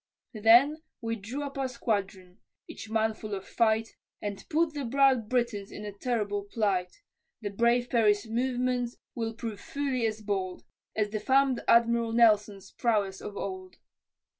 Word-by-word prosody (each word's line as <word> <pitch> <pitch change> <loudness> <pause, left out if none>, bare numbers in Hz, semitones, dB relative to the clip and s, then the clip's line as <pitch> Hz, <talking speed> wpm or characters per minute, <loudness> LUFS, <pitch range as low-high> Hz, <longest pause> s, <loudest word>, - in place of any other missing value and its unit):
Then 240 +8 +5 0.2
we 230 -1 -2
drew 230 +7 -5
up 280 -1 -6
our 265 - 0
squadron, 200 -6 -3 0.3
each 220 - -9
man 220 0 +1
full 215 -1 -6
of 190 - -8
fight, 225 -1 +1 0.2
And 205 -1 -5
put 320 0 +1
the 290 -2 -4
proud 260 -3 +3
Britons 235 -5 -1
in 210 - -7
a 205 - -5
terrible 205 -2 -2
plight, 200 -4 -1 0.4
The 205 -2 -4
brave 235 +3 +2
Perry's 210 -4 +3
movements 245 +1 -1 0.2
will 225 -1 -3
prove 225 -3 -5
fully 265 -4 -1
as 215 0 -4
bold, 190 -3 -3 0.3
As 210 -1 0
the 215 - -2
fam'd 265 +2 +3
Admiral 235 -1 +4
Nelson's 210 -4 +3
prowess 205 -5 0
of 205 -1 -7
old. 185 -1 -6
225 Hz, 155 wpm, -29 LUFS, 205-245 Hz, 0.4 s, Then